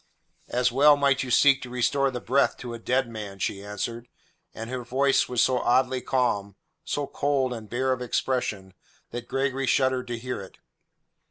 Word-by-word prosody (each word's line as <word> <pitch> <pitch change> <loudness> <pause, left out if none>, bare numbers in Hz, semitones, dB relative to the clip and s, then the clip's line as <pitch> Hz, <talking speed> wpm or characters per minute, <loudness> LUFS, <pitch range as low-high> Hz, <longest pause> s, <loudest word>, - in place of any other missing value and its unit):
"As 125 0 +1
well 145 +3 +6
might 140 -2 +2
you 130 - -4
seek 135 +2 +5
to 125 - -7
restore 130 +3 +1
the 125 -2 -4
breath 135 +4 +1
to 120 -1 -7
a 115 - -7
dead 125 +2 0
man," 105 -4 -7
she 100 +1 -3
answered, 115 +4 -5 0.4
and 115 0 -7
her 125 0 -4
voice 130 +2 +2
was 125 -2 +2
so 130 -1 +2
oddly 130 +1 +2
calm, 100 -7 0 0.3
so 145 - -2
cold 140 -3 0
and 110 -3 -8
bare 130 +2 0
of 125 - -5
expression, 115 -6 -2 0.4
that 120 0 -6
Gregory 135 0 -1
shuddered 130 -1 +2
to 120 -1 -3
hear 125 -1 -5
it. 95 - -12
125 Hz, 180 wpm, -26 LUFS, 115-135 Hz, 0.4 s, well